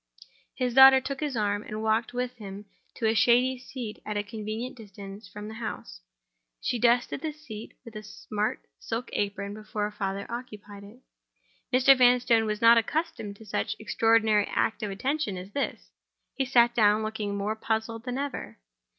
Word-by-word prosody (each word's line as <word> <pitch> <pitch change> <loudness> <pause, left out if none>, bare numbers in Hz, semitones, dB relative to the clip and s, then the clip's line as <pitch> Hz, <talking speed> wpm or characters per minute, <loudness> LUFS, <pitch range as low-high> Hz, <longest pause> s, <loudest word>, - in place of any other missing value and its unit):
His 250 -2 -1
daughter 265 +1 +9
took 270 +1 -5
his 290 -5 -2
arm, 205 -1 0
and 215 +1 -6
walked 220 +1 +1
with 250 0 -3
him 200 -1 -8 0.3
to 230 - -3
a 220 - +3
shady 250 +3 +3
seat 245 -4 -7
at 210 -1 -3
a 205 - 0
convenient 220 +3 -5
distance 200 -2 -10
from 210 0 -8
the 220 - -7
house. 220 - -7 0.6
She 245 - -2
dusted 245 +3 +2
the 315 - -2
seat 245 -8 -10
with 230 - -11
her 215 - -6
smart 210 0 -4
silk 235 +3 -4
apron 200 0 -2
before 215 0 -5
her 210 - -1
father 200 -1 -3
occupied 210 -4 -8
it. 215 +6 -14 0.7
Mr. 265 +1 +6
Vanstone 245 -3 +4
was 210 +1 -2
not 230 0 +8
accustomed 230 -5 -3
to 220 - -14
such 210 - -2
an - - -15
extraordinary 220 -1 +3
act 225 - 0
of 210 - -2
attention 235 +1 -2
as 185 +2 -8
this. 280 - -4 0.4
He 270 - -1
sat 240 -2 +4
down, 215 -2 +4
looking 215 -2 -3
more 205 +2 -1
puzzled 220 +1 -2
than 250 0 -3
ever. 280 -1 -5
220 Hz, 175 wpm, -27 LUFS, 210-250 Hz, 0.7 s, daughter